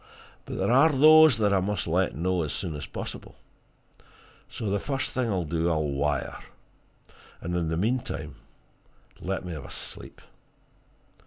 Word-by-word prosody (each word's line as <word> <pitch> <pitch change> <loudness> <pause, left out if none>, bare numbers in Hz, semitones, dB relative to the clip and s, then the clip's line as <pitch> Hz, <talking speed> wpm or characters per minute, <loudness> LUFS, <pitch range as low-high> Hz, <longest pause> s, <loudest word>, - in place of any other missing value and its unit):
But - - -6
there - - +1
are 135 +6 +6
those 155 -1 +7
that 105 -2 +2
I 95 - +4
must 95 -5 -1
let - - 0
know 90 +3 0
as 75 -3 -2
soon 90 -5 -3
as 75 -2 -6
possible 70 - -7 1.1
so 110 - -5
the 100 - +1
first 135 +4 -2
thing 125 -3 -1
I'll 95 -4 0
do, 85 +1 -1
I'll 80 -2 +1
wire. 70 +1 -2 1.0
And 85 +1 -4
in 85 -2 0
the 80 - -1
meantime, 115 +7 -2 0.9
let 95 0 -3
me 90 - -5
have 75 -3 -7
a - - -10
sleep." - - -9
95 Hz, 160 wpm, -27 LUFS, 80-120 Hz, 1.1 s, those